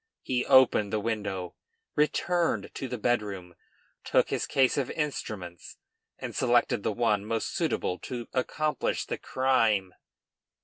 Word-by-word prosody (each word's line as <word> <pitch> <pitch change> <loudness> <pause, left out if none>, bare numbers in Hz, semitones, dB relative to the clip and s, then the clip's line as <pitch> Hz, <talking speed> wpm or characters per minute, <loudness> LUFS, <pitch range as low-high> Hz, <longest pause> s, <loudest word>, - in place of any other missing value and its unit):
He 125 -1 -1
opened 120 -6 +5
the 110 - 0
window, 100 -5 -3 0.4
returned 170 +3 +1
to 135 - -4
the 125 - -4
bedroom, 105 -6 -1 0.5
took - - +2
his - - -1
case 130 -2 +3
of 140 -3 -1
instruments, 105 - -5 0.4
and - - -6
selected 120 -4 +2
the - - 0
one 105 -2 +1
most 110 +1 -2
suitable 90 - -1
to 120 -2 -6
accomplish 150 +4 -1
the - - -4
crime. 110 -8 +1
115 Hz, 130 wpm, -28 LUFS, 100-130 Hz, 0.5 s, opened